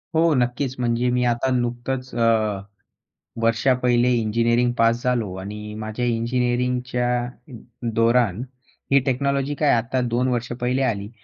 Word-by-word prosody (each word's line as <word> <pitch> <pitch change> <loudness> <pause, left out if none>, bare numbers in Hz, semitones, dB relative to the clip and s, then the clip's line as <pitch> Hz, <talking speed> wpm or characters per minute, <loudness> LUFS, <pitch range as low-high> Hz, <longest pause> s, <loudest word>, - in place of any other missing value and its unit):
हो, 165 0 +4
नक्कीच. 125 +1 -1
म्हणजे 120 0 +1
मी 125 0 +1
आता 120 +3 -1
नुकतंच 125 +2 -3
अ, 110 -4 +1 0.8
वर्षा 115 +3 +3
पहिले 125 0 +3
इंजिनिअरिंग 115 +1 +2
पास 115 +1 +2
झालो 120 -6 0
आणि 105 +2 -7
माझ्या 110 +3 -3
इंजिनिअरिंगच्या 125 +1 0 0.2
अ, 125 +4 -13 0.4
दौरान 115 -2 +2 0.5
ही 140 - +6
टेक्नॉलॉजी 140 +1 0
काय, 150 0 +1
आता 120 +2 0
2 125 +1 0
वर्षां 120 -1 -2
पहिले 125 +2 0
आली. 105 -5 -1
120 Hz, 135 wpm, -22 LUFS, 115-125 Hz, 0.8 s, ही